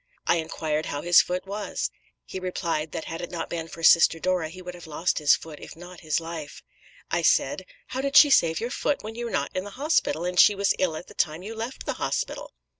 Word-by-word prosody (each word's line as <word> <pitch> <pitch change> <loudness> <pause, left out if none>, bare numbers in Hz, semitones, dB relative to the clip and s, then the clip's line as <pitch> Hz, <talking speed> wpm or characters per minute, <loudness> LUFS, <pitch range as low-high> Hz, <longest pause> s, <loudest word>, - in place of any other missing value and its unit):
I - - +3
inquired 155 -1 -2
how 145 - -4
his 175 0 +7
foot 180 +1 -4
was. 200 +1 -3 0.3
He 190 - -6
replied 170 -4 -2
that - - -5
had 165 +1 -6
it 175 - -5
not 170 -2 -5
been 165 -1 -3
for 165 +1 -10
Sister 165 0 +6
Dora 180 -1 -1
he 185 +3 -11
would 180 -1 -8
have 175 -2 -12
lost 160 +3 -1
his 150 -1 +5
foot, 155 -2 -10
if - - -10
not 175 +1 -12
his 155 -2 0
life. 165 -2 -8 0.5
I - - +1
said, - - +2 0.2
'How 260 - -3
did 275 +1 +2
she 290 - +8
save 165 -9 +4
your 235 +2 -3
foot 290 +1 -1
when 215 +1 -6
you 240 +1 -5
were - - -3
not - - -2
in 185 - -1
the 205 - -8
hospital, 275 - +1
and 180 0 -1
she 205 - +7
was 200 0 +2
ill 175 -4 +1
at 165 - -7
the - - -14
time 160 +2 -1
you 215 +3 -6
left 225 +3 -6
the - - -1
hospital?' - - -2
175 Hz, 245 wpm, -25 LUFS, 160-200 Hz, 0.5 s, she